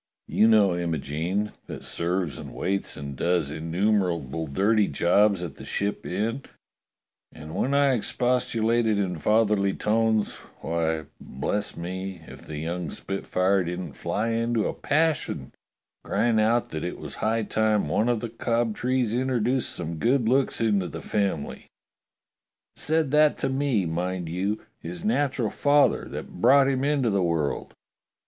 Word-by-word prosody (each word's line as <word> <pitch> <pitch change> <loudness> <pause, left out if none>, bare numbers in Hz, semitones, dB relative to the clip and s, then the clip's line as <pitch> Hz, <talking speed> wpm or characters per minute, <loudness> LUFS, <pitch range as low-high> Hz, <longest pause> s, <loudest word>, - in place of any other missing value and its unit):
You 110 - +4
know 105 -5 +5
Imogene, 85 +4 -2 0.2
that - - -7
serves 85 -2 -2
and - - -9
waits 100 +1 -1
and 70 -2 -6
does 85 0 0
innu 85 +7 0
merable 85 -6 -1
dirty 105 +6 +3
jobs 100 +1 +3
at 85 - -7
the - - -10
Ship 100 +1 -2
Inn; 110 +8 -2 0.9
and 75 +1 -10
when 135 +9 0
I 140 -2 +4
expostu 125 0 0
lated 115 -1 +2
in 90 -4 -1
fatherly 105 -1 +2
tones, 110 0 +1 0.2
why, 80 -1 -1
bless 100 +10 -3
me, 95 0 -5
if - - -12
the 75 - -6
young 85 +1 -3
spitfire 95 +2 0
didn't 90 -3 -5
fly 110 +3 -2
into 115 -1 0
a - - -2
passion, 150 - 0 0.5
crying 115 -2 +1
out 115 +2 +2
that 80 - -4
it 90 - -4
was - - -7
high 110 +1 +1
time 105 -3 +1
one 105 +10 +1
of 120 -3 +1
the 120 - -4
Cobtrees 120 +1 0
introduced 125 0 +1
some 85 -1 -4
good 120 - +2
looks 130 +3 +2
into 105 -5 +1
the - - -7
family. 100 -8 -2 1.1
Said 155 -2 +1
that 150 0 +4
to - - -1
me, 135 -7 +1
mind 90 +1 -2
you 95 +5 -2
— - - -47
his 85 +1 -6
natural 125 -1 +1
father 145 0 +3
that 90 - -8
brought 135 +3 +6
him 135 -1 0
into 140 -5 +2
the 100 -1 +1
world. 85 -4 -1
105 Hz, 150 wpm, -26 LUFS, 85-120 Hz, 1.1 s, brought